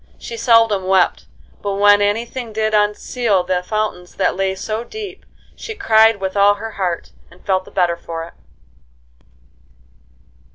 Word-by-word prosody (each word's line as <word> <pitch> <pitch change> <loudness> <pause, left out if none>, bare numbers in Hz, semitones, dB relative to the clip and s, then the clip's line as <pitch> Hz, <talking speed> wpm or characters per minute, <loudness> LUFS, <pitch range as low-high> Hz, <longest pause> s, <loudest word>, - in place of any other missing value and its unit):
She 235 - -8
seldom 225 -4 +3
wept, 190 -1 +2 0.3
but 200 -1 -2
when 205 0 +5
any 205 +3 +1
thing 240 -2 -7
did 215 0 -1
unseal 210 0 +1
the 180 0 -1
fountains 180 -2 -3
that - - +1
lay 190 0 -1
so 215 +4 -4
deep, 405 - -9 0.3
she 445 - -7
cried 225 - +4
with 190 0 -3
all 200 0 +5
her 220 +2 -7
heart, 180 -5 -3 0.2
and 180 - -20
felt 190 -2 0
the - - -13
better 175 -2 +1
for 165 -1 -6
it. 165 - -11
205 Hz, 155 wpm, -18 LUFS, 190-225 Hz, 0.3 s, when